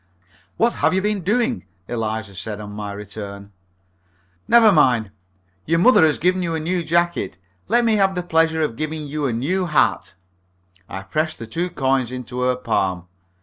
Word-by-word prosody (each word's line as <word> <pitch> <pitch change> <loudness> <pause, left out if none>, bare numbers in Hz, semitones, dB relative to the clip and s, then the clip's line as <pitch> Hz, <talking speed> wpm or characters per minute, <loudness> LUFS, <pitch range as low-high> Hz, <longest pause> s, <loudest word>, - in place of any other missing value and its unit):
"What 235 +1 +2
have - - +3
you 190 - +2
been 210 -1 0
doing?" 230 - 0 0.2
said - - -6
Eliza, 110 -2 -4
on 105 -1 -8
my 105 0 -5
return. 100 0 -8 1.0
"Never 230 -2 +7
mind. 125 - +3 0.6
Your 165 +2 +2
mother 210 +2 +6
has 150 - 0
given 185 +2 +1
you 165 -2 -1
a - - -1
new 175 +2 -1
jacket. 170 - 0 0.3
Let 235 +3 +3
me 220 -2 +3
have 195 -1 +2
the 180 - -2
pleasure 160 -1 +2
of 130 -7 -2
giving 155 0 -3
you 145 0 -2
a - - -1
new 170 +11 -1
hat." 155 - +1 0.7
I 95 +1 -6
pressed 155 +11 -2
the 115 - -7
two 170 +11 -3
coins 130 -5 0
into 125 0 -5
her 125 0 +2
palm. 90 -7 -1
155 Hz, 175 wpm, -21 LUFS, 110-180 Hz, 1.0 s, Never